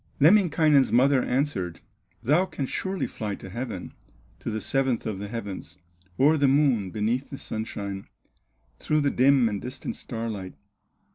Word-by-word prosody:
Lemminkainen's 155 Hz, -4 st, +5 dB
mother 130 Hz, +2 st, +4 dB
answered: 125 Hz, -, -1 dB, 0.4 s
"Thou 155 Hz, +10 st, +3 dB
canst 150 Hz, -6 st, -4 dB
surely 190 Hz, 0 st, -2 dB
fly 105 Hz, -3 st, -4 dB
to 95 Hz, -, -10 dB
heaven, 115 Hz, -4 st, -5 dB, 0.5 s
To -, -, -4 dB
the 110 Hz, -1 st, -2 dB
seventh 130 Hz, 0 st, 0 dB
of 105 Hz, -4 st, -3 dB
the 105 Hz, -, -5 dB
heavens, 100 Hz, -6 st, -6 dB, 0.4 s
O'er 150 Hz, +4 st, +5 dB
the 140 Hz, -1 st, +3 dB
Moon, 135 Hz, -8 st, +3 dB
beneath 115 Hz, +6 st, -1 dB
the 135 Hz, -, -7 dB
sunshine, 100 Hz, -4 st, -5 dB, 0.7 s
Through 150 Hz, 0 st, +1 dB
the 140 Hz, -1 st, +2 dB
dim 130 Hz, -1 st, +4 dB
and 105 Hz, -2 st, -3 dB
distant 130 Hz, +2 st, -6 dB
starlight. 110 Hz, -6 st, -5 dB
125 Hz, 145 wpm, -26 LUFS, 105-140 Hz, 0.7 s, Lemminkainen's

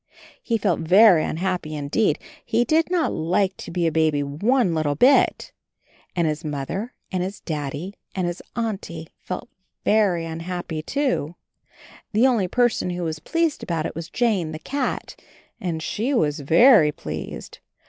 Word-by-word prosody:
He 230 Hz, -, 0 dB
felt 195 Hz, -6 st, 0 dB
very 180 Hz, +1 st, +6 dB
un -, -, -3 dB
happy 180 Hz, -4 st, -2 dB
indeed; 150 Hz, +9 st, +1 dB, 0.3 s
he 230 Hz, +2 st, +1 dB
did 320 Hz, +6 st, +2 dB
not 350 Hz, -3 st, +1 dB
like 185 Hz, +4 st, 0 dB
to -, -, -8 dB
be 175 Hz, 0 st, -1 dB
a 165 Hz, -, +2 dB
baby 155 Hz, -2 st, +2 dB
one 190 Hz, -, +1 dB
little 155 Hz, -3 st, 0 dB
bit. 260 Hz, -, +4 dB, 0.6 s
And 170 Hz, -2 st, +1 dB
his 155 Hz, 0 st, -2 dB
Mother 155 Hz, -, -4 dB, 0.2 s
and 185 Hz, -, -1 dB
his 190 Hz, +3 st, -4 dB
Daddy 150 Hz, +3 st, -4 dB, 0.2 s
and 185 Hz, -2 st, 0 dB
his 175 Hz, 0 st, -3 dB
Auntie 195 Hz, -8 st, -4 dB
felt 185 Hz, +6 st, -6 dB, 0.4 s
very 195 Hz, -6 st, +3 dB
unhappy, 165 Hz, 0 st, -4 dB
too. 250 Hz, -, -1 dB, 0.8 s
The 220 Hz, +5 st, +4 dB
only 235 Hz, -8 st, +3 dB
person 240 Hz, -2 st, +1 dB
who 175 Hz, 0 st, -3 dB
was 160 Hz, -2 st, -3 dB
pleased 330 Hz, -, 0 dB
about 165 Hz, -3 st, -2 dB
it -, -, -4 dB
was 165 Hz, +2 st, -6 dB
Jane, 200 Hz, -10 st, 0 dB
the -, -, -4 dB
cat, 265 Hz, -, -4 dB, 0.4 s
and 165 Hz, -3 st, -3 dB
she 245 Hz, +10 st, -1 dB
was 150 Hz, -9 st, +1 dB
very 165 Hz, -, +6 dB
pleased. -, -, -7 dB
180 Hz, 160 wpm, -23 LUFS, 160-225 Hz, 0.8 s, very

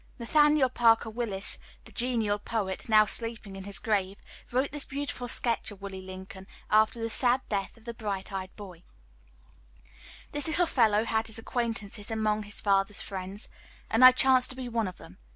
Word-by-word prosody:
Nathaniel 295 Hz, +3 st, +3 dB
Parker 230 Hz, -2 st, +3 dB
Willis, 215 Hz, -4 st, -2 dB, 0.3 s
the -, -, -13 dB
genial 230 Hz, -4 st, 0 dB
poet, 205 Hz, -2 st, -4 dB
now 215 Hz, -1 st, +6 dB
sleeping 225 Hz, -2 st, -2 dB
in 195 Hz, 0 st, -8 dB
his 200 Hz, -2 st, +3 dB
grave, 195 Hz, -1 st, 0 dB, 0.3 s
wrote 260 Hz, +3 st, 0 dB
this 295 Hz, -1 st, -4 dB
beautiful 275 Hz, -3 st, -4 dB
sketch 235 Hz, -1 st, +1 dB
of 205 Hz, -3 st, -11 dB
Willie 195 Hz, -1 st, -7 dB
Lincoln, 190 Hz, 0 st, -10 dB, 0.2 s
after 215 Hz, +2 st, +3 dB
the 225 Hz, -, -2 dB
sad 245 Hz, +2 st, +2 dB
death 200 Hz, +1 st, -3 dB
of 225 Hz, -, -21 dB
the 235 Hz, -, -5 dB
bright 205 Hz, -4 st, -5 dB
eyed 190 Hz, -1 st, -4 dB
boy: 185 Hz, -5 st, -11 dB, 1.5 s
"This 290 Hz, +1 st, +1 dB
little 330 Hz, +3 st, +2 dB
fellow 225 Hz, -7 st, +2 dB
had 225 Hz, 0 st, 0 dB
his 220 Hz, -, -3 dB
acquaintances 225 Hz, -3 st, -3 dB
among 215 Hz, -1 st, 0 dB
his 205 Hz, -1 st, -2 dB
father's 195 Hz, 0 st, +1 dB
friends, 195 Hz, +1 st, -6 dB, 0.4 s
and 225 Hz, +3 st, +3 dB
I 255 Hz, -, +12 dB
chanced 255 Hz, 0 st, +4 dB
to 255 Hz, -, -2 dB
be 255 Hz, -1 st, -6 dB
one 230 Hz, -3 st, -1 dB
of 180 Hz, -, -8 dB
them. 90 Hz, -, -15 dB
220 Hz, 175 wpm, -28 LUFS, 200-240 Hz, 1.5 s, I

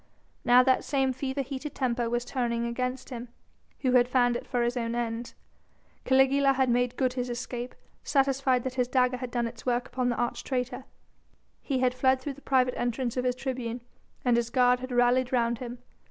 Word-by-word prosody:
Now 245 Hz, +1 st, +6 dB
that 260 Hz, 0 st, +3 dB
same 270 Hz, -2 st, +1 dB
fever 265 Hz, +1 st, -3 dB
heated 275 Hz, +2 st, -6 dB
temper 245 Hz, -3 st, 0 dB
was 240 Hz, +1 st, -1 dB
turning 235 Hz, -2 st, -1 dB
against 250 Hz, +2 st, -3 dB
him, 245 Hz, 0 st, -6 dB, 0.5 s
who 255 Hz, -, +2 dB
had 245 Hz, -1 st, +5 dB
fanned 245 Hz, -1 st, +2 dB
it -, -, -5 dB
for 245 Hz, -2 st, 0 dB
his 240 Hz, +1 st, 0 dB
own 235 Hz, -1 st, -2 dB
ends. 235 Hz, 0 st, -3 dB, 0.7 s
Caligula 270 Hz, +1 st, +4 dB
had 260 Hz, -1 st, +1 dB
made 245 Hz, +1 st, +1 dB
good 255 Hz, -2 st, +1 dB
his 250 Hz, -1 st, -3 dB
escape, 240 Hz, 0 st, -5 dB, 0.3 s
satisfied 270 Hz, -2 st, +2 dB
that 260 Hz, -, -3 dB
his 250 Hz, -1 st, 0 dB
dagger 255 Hz, 0 st, +2 dB
had 250 Hz, 0 st, -5 dB
done 240 Hz, -1 st, -1 dB
its 230 Hz, -1 st, -7 dB
work 245 Hz, -1 st, 0 dB
upon 250 Hz, 0 st, -1 dB
the 240 Hz, -, 0 dB
arch 240 Hz, 0 st, -2 dB
traitor. 255 Hz, 0 st, -3 dB, 0.8 s
He 265 Hz, -3 st, -1 dB
had 250 Hz, -1 st, +3 dB
fled 260 Hz, +1 st, +2 dB
through 275 Hz, +2 st, -5 dB
the 285 Hz, -, -16 dB
private 255 Hz, -2 st, +2 dB
entrance 240 Hz, 0 st, -1 dB
of 250 Hz, 0 st, -1 dB
his 250 Hz, -1 st, +1 dB
tribune, 250 Hz, -2 st, -4 dB, 0.4 s
and 245 Hz, -1 st, +4 dB
his 235 Hz, -1 st, 0 dB
guard 250 Hz, 0 st, +3 dB
had 255 Hz, +1 st, -7 dB
rallied 245 Hz, +1 st, +3 dB
round 235 Hz, -2 st, +1 dB
him. 245 Hz, -1 st, -6 dB
250 Hz, 200 wpm, -28 LUFS, 240-260 Hz, 0.8 s, Now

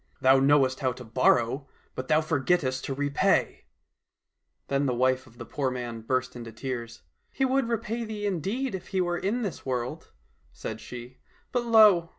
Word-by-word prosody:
Thou 130 Hz, +1 st, +5 dB
knowest 135 Hz, -1 st, +4 dB
how 130 Hz, -2 st, 0 dB
to 125 Hz, +1 st, -10 dB
borrow, 130 Hz, +3 st, +2 dB, 0.3 s
but 130 Hz, -, -5 dB
thou 155 Hz, 0 st, +4 dB
forgettest 150 Hz, -3 st, 0 dB
to 135 Hz, -, -3 dB
repay! 145 Hz, 0 st, +1 dB, 0.5 s
" -, -, -54 dB
Then 140 Hz, 0 st, +1 dB
the 125 Hz, -, 0 dB
wife 130 Hz, +1 st, +1 dB
of 115 Hz, 0 st, -19 dB
the 120 Hz, -, -7 dB
poor 135 Hz, +1 st, -1 dB
man 120 Hz, -3 st, -5 dB
burst 130 Hz, +2 st, -1 dB
into 115 Hz, -2 st, -7 dB
tears. 120 Hz, -, -6 dB
" -, -, -46 dB
He 270 Hz, -, +1 dB
would 265 Hz, -2 st, +1 dB
repay 230 Hz, 0 st, -2 dB
thee 215 Hz, -2 st, -5 dB
indeed 205 Hz, -, -1 dB
if 190 Hz, -, -6 dB
he 190 Hz, -, -1 dB
were 175 Hz, -1 st, 0 dB
in 230 Hz, +6 st, -1 dB
this 195 Hz, -6 st, -4 dB
world," 130 Hz, +4 st, -3 dB, 0.4 s
said 110 Hz, 0 st, -6 dB
she, 125 Hz, +1 st, -9 dB
*' -, -, -34 dB
but 245 Hz, -1 st, 0 dB
lo 215 Hz, -5 st, +7 dB
now 170 Hz, -, -19 dB
135 Hz, 190 wpm, -27 LUFS, 125-190 Hz, 0.5 s, lo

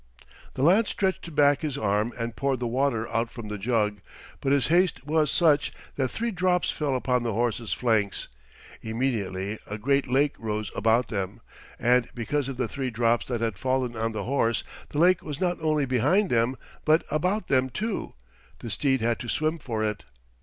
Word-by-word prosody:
The 130 Hz, -, -1 dB
lad 195 Hz, +8 st, +5 dB
stretched 185 Hz, -4 st, -2 dB
back 145 Hz, -1 st, +4 dB
his 150 Hz, -3 st, -2 dB
arm 105 Hz, 0 st, +1 dB
and 115 Hz, -1 st, -4 dB
poured 135 Hz, -2 st, 0 dB
the 125 Hz, -, -2 dB
water 120 Hz, -2 st, 0 dB
out 115 Hz, 0 st, 0 dB
from 115 Hz, -3 st, -8 dB
the 105 Hz, -1 st, -4 dB
jug, 105 Hz, -1 st, 0 dB, 0.4 s
but 135 Hz, -, -1 dB
his 140 Hz, -2 st, +3 dB
haste 175 Hz, -4 st, +2 dB
was 155 Hz, 0 st, +2 dB
such 150 Hz, -3 st, +3 dB, 0.2 s
that 135 Hz, -2 st, +1 dB
three 235 Hz, -, -2 dB
drops 180 Hz, -2 st, +1 dB
fell 145 Hz, -3 st, -1 dB
upon 125 Hz, -1 st, +1 dB
the 115 Hz, -2 st, -2 dB
horse's 115 Hz, 0 st, -1 dB
flanks. 110 Hz, -5 st, 0 dB, 0.5 s
Immediately 110 Hz, -4 st, -2 dB
a 105 Hz, -, -4 dB
great 140 Hz, +5 st, +1 dB
lake 135 Hz, +3 st, +2 dB
rose 105 Hz, -3 st, -3 dB
about 115 Hz, +2 st, +2 dB
them, 100 Hz, -3 st, -3 dB, 0.4 s
and 125 Hz, 0 st, +3 dB
because 135 Hz, +4 st, -1 dB
of 135 Hz, -2 st, -5 dB
the 125 Hz, -2 st, 0 dB
three 135 Hz, +1 st, -3 dB
drops 115 Hz, 0 st, +1 dB
that 120 Hz, -3 st, -2 dB
had 110 Hz, -5 st, -2 dB
fallen 130 Hz, -1 st, 0 dB
on 115 Hz, 0 st, -1 dB
the 110 Hz, -, -4 dB
horse, 115 Hz, -3 st, +1 dB, 0.3 s
the -, -, -6 dB
lake 175 Hz, +3 st, +5 dB
was 150 Hz, -1 st, -6 dB
not 180 Hz, -2 st, 0 dB
only 155 Hz, -2 st, +2 dB
behind 145 Hz, -, +2 dB
them 120 Hz, +2 st, +2 dB, 0.3 s
but 155 Hz, +1 st, +4 dB
about 180 Hz, +7 st, 0 dB
them, 130 Hz, -1 st, +2 dB
too; 215 Hz, -, -3 dB, 0.4 s
the 115 Hz, -, -7 dB
steed 135 Hz, -4 st, +1 dB
had 115 Hz, 0 st, +1 dB
to 120 Hz, -, -6 dB
swim 155 Hz, +5 st, 0 dB
for 115 Hz, -6 st, -3 dB
it. 105 Hz, -1 st, -2 dB
125 Hz, 190 wpm, -26 LUFS, 115-150 Hz, 0.5 s, lad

